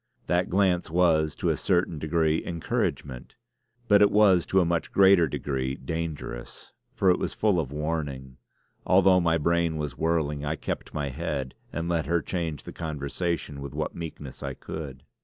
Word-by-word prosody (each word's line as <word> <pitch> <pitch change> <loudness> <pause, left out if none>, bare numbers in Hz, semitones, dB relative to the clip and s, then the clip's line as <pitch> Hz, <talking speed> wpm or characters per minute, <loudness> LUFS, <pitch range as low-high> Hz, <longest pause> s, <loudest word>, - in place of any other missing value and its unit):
That 90 +2 +1
glance 90 -2 +2
was 80 -3 +2
to - - -1
a - - +2
certain 85 -3 0
degree 80 0 +1
encouragement; 70 -6 -3 0.5
but 100 -1 +6
it 105 - +7
was 100 -5 +4
to 95 - +3
a 90 - +3
much 85 0 -1
greater 95 -4 +6
degree 65 -2 -2
dangerous, 75 -4 -6 0.2
for 95 - +4
it 90 - +1
was - - -3
full 105 -5 +2
of 70 -5 -3
warning. 75 -4 -4 0.5
Although 95 0 +5
my 85 -1 +2
brain 85 0 +1
was 75 -2 -4
whirling, 80 -3 0
I 75 +2 -1
kept - - -5
my 75 -2 -1
head 65 0 -3 0.2
and 85 +2 -3
let 85 -2 0
her 85 -1 +1
change 85 -5 -3
the - - -9
conversation 75 -1 -3
with 70 -1 -7
what - - -2
meekness 75 -5 -8
I - - -4
could. 70 -4 -7
80 Hz, 170 wpm, -27 LUFS, 75-85 Hz, 0.5 s, it